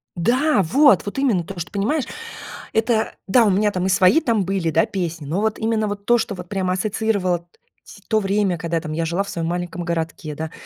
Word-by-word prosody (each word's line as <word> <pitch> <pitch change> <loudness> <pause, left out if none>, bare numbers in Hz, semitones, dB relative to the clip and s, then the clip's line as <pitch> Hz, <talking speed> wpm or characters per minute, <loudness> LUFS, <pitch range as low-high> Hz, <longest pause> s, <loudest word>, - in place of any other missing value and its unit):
Да, 245 - +2
вот 250 - +5
вот 205 - -5
именно 235 -11 +2
то, 185 +1 -8
что 170 - -5
понимаешь 230 +8 0 0.7
это, 220 0 +1
да, 230 +5 +5
у - - +4
меня 205 +2 +2
там 185 -2 -2
и - - +1
свои 185 - +5
там 230 - +1
были, 190 -3 -1
да 215 - +3
песни, 170 -7 -4
но 165 +8 -1
вот 220 0 -1
именно 220 -1 0
вот 205 0 -5
то, 240 +2 +4
что 220 -3 -2
вот 180 -1 -9
прямо 190 -2 -1
ассоциировало 195 -2 0
т 170 - -25 0.4
сь - - -14
то 220 - +2
время, 195 -2 0
когда 170 0 -1
я - - -2
там, 155 -2 -5
я 165 +2 -1
жила 170 +4 0
в 200 - -9
своем 165 -3 -3
маленьком 175 0 -3
городке, 165 -2 -3
да. 160 +2 -5
195 Hz, 230 wpm, -21 LUFS, 170-220 Hz, 0.7 s, вот